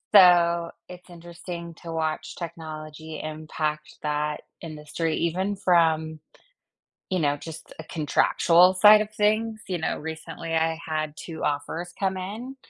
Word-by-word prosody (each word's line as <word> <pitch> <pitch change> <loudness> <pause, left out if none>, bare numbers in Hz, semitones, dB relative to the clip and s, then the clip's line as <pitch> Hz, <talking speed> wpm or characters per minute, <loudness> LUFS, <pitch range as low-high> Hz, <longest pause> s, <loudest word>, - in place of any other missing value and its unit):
so 170 -2 +6 0.2
it's 180 0 -12
interesting 170 0 -8
to 165 - -6
watch 160 -1 -2
technology 160 -2 -7
impact 155 0 -4
that 150 0 -1 0.2
industry 155 0 -3
even 185 +4 0
from, 160 -4 +2 0.9
you 185 - +1
know, 145 -2 +1
just 160 +2 -10
a 160 - -7
contractual 170 +3 +4
side 210 +3 +8
of 215 0 -3
things. 215 +1 +1
You 180 -2 -1
know, 160 - -2
recently, 160 +1 -6
I 160 0 +1
had 155 -1 -2
2 160 -2 -7
offers 160 +4 -2
come 190 -1 0
in, 220 +8 -6
165 Hz, 130 wpm, -25 LUFS, 155-180 Hz, 0.9 s, side